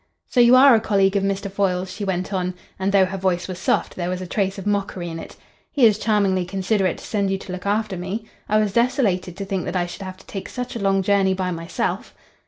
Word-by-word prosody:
"So - - -1
you 240 +1 +7
are 270 +1 +8
a 225 - +5
colleague 195 -2 +2
of 200 - +3
Mr. 195 0 -2
Foyle's?" 185 -1 -1
she 205 - -6
went 190 0 -2
on, 185 -1 -1 0.2
and 190 +1 0
though 195 -1 +5
her 190 +1 -5
voice 185 -1 0
was 185 -1 -6
soft - - 0
there 175 -1 -3
was 180 0 -2
a 185 - -5
trace 195 +1 -1
of 195 - -7
mockery 200 -4 -1
in 165 0 -6
it. - - -10 0.4
"He 275 -5 +4
is 215 -2 +4
charmingly 200 -4 +2
considerate 190 0 0
to - - -12
send 200 -2 0
you 195 - 0
to 190 - -9
look 185 +1 -5
after 210 -1 0
me. 190 +5 -4 0.2
I 215 - +3
was 210 -2 +1
desolated 205 -7 +1
to 200 - -4
think 190 -2 -2
that - - -4
I 175 -1 +1
should 175 - -9
have 185 -1 -7
to - - -18
take 195 - -7
such 250 0 -5
a - - -3
long 195 -1 +2
journey 195 -1 +2
by 185 -1 -2
myself." 165 0 -3
195 Hz, 255 wpm, -22 LUFS, 185-205 Hz, 0.4 s, are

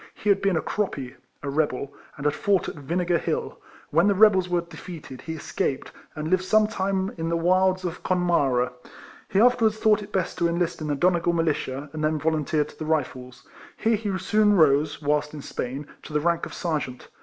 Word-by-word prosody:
He 210 - -2
had 200 -1 +4
been 195 -4 +2
a - - -1
croppy, 140 -11 -3 0.3
(a 140 - -3
rebel) 140 -2 -1 0.2
and 140 - -7
had 150 - +3
fought 200 -3 +1
at - - -4
Vinegar 170 +4 -1
Hill. - - -3 0.3
W^hen 170 +5 +4
the 200 - +3
rebels 190 -3 +5
were 175 -1 +1
dtfcated 160 -5 -10
he 160 - -5
escaped, 140 -3 -3 0.2
and 155 0 -4
lived 185 +2 +2
some 215 +3 +4
time 195 -2 -1
in 165 0 -1
the 170 - +1
wilds 185 +2 +2
of 175 - -4
Connemara. 145 -9 +1 0.6
He 195 - +2
afterwards 225 -2 +4
thought 215 -1 +3
it 205 0 -10
best 190 -4 -2
to 170 - +3
enlist 170 -1 -1
in 155 - -3
the 145 - 0
Donegal 175 +2 +2
Militia, 150 -4 -1
and 155 -1 -4
then 155 0 +1
volunteered 155 -1 0
to - - -17
the - - -3
Rifles. 130 -5 -3 0.3
Here 225 0 +2
he 205 -3 -2
soon 210 +2 +3
rose 150 -2 +3
(whilst 150 +1 0
in 145 - -8
Spain) 135 +1 -4 0.2
to 155 - -11
the 150 - +2
rank 170 +2 0
of - - -11
Sergeant. 150 -7 -3
170 Hz, 200 wpm, -25 LUFS, 150-190 Hz, 0.6 s, rebels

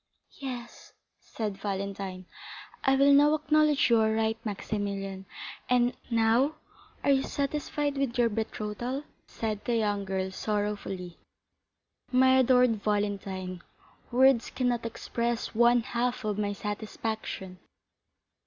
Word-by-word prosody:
"Yes," 250 -3 -7 0.3
said 210 -4 -5
Valentine, 195 -2 -4 0.6
"I 270 - +4
will 280 +1 +6
now 295 +2 +6
acknowledge 305 -3 +3
you 230 - +6
are 220 0 +3
right, 220 0 0
Maximilian; 195 -2 -4 0.4
and 245 0 +3
now 230 +6 +3 0.5
are - - +4
you 270 -1 +4
satisfied 290 +1 -2
with 265 -2 -1
your 240 -1 +4
betrothal?" 225 +4 -3 0.2
said 215 -2 -4
the 240 - +1
young 205 -3 0
girl 190 0 -2
sorrowfully. 205 -4 -3 0.9
"My 260 +1 +5
adored 250 -2 +4
Valentine, 195 -3 -2 0.5
words 255 -1 +4
cannot 245 -2 -1
express 235 +1 -3
one 240 +1 +5
half 245 0 -2
of 210 -1 0
my 205 -1 0
satisfaction." 210 -2 -5
225 Hz, 115 wpm, -29 LUFS, 205-255 Hz, 0.9 s, will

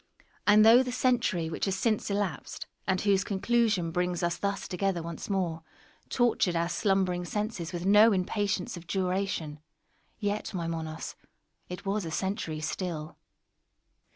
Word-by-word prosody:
And 210 +1 +7
though 235 +3 +8
the 250 -1 -2
century 245 -9 +1
which 160 - -2
has 195 -1 0
since 215 +2 0
elapsed, 200 -8 -3 0.2
and 190 -1 +2
whose 200 -2 +2
conclusion 210 -4 +1
brings 180 0 -1
us 170 0 +1
thus 200 0 -2
together 185 -2 -1
once 170 +3 -6
more, 175 -5 -1 0.5
tortured 235 -7 +2
our 170 +1 +1
slumbering 185 -1 +1
senses 205 -2 -3
with 175 0 -4
no 210 +3 +7
impatience 200 0 -1
of 175 -1 -10
duration, 185 -5 -1 0.6
yet, 205 -1 -2
my 170 -2 -2
Monos, 160 -1 -4 0.6
it 180 +2 -7
was 200 +1 0
a 165 - -4
century 160 -2 -2
still. 155 0 -4
190 Hz, 145 wpm, -29 LUFS, 170-205 Hz, 0.6 s, though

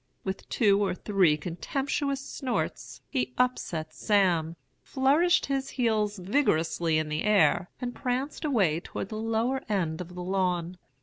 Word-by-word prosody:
With 190 0 -5
two 205 -2 +3
or 190 -2 0
three 185 -7 +2
contemptuous 275 - -2
snorts 260 -4 -3
he 250 -2 -2
upset 170 -11 -1
Sam, 175 -6 +2 0.3
flourished 290 +6 +3
his 270 -1 -2
heels 215 -4 0
vigorously 170 - +1
in 155 0 0
the 150 0 -2
air, 195 -4 +3
and 245 -1 -4
pranced 260 +5 -3
away 200 - +2
toward 190 - -6
the 215 - -5
lower 225 +4 0
end 175 -5 -1
of 180 0 -9
the 180 - -5
lawn. 180 -1 -1
205 Hz, 140 wpm, -28 LUFS, 175-250 Hz, 0.3 s, two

